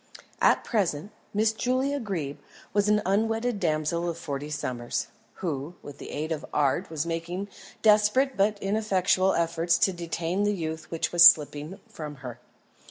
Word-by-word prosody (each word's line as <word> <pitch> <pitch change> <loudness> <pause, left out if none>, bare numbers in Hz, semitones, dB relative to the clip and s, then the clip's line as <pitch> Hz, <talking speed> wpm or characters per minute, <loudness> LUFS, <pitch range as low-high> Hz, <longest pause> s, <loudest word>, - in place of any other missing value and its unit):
At - - +4
present, 200 - -1 0.2
Miss 215 +1 +2
Julia 260 +5 0
Greeb 170 - -4 0.3
was 205 0 +2
an 210 0 +3
unwedded 225 +3 0
damsel 170 +1 0
of 170 - -4
forty 145 -2 -5
summers, 125 -5 -3 0.4
who, 150 +1 -3
with 145 -1 -10
the - - -8
aid 155 +2 -4
of 155 -2 -3
art, 150 +5 +1
was 160 -1 -2
making 170 +4 -4 0.3
desperate 215 +5 +4
but 205 +1 +2
ineffectual 195 -2 +2
efforts 170 0 +1
to 190 - +2
detain 170 +2 -3
the 205 0 +1
youth 160 -2 -5
which 165 - -2
was 175 -1 +6
slipping 150 +5 +2
from 150 -2 -8
her. 125 -1 -7
175 Hz, 155 wpm, -27 LUFS, 155-210 Hz, 0.4 s, was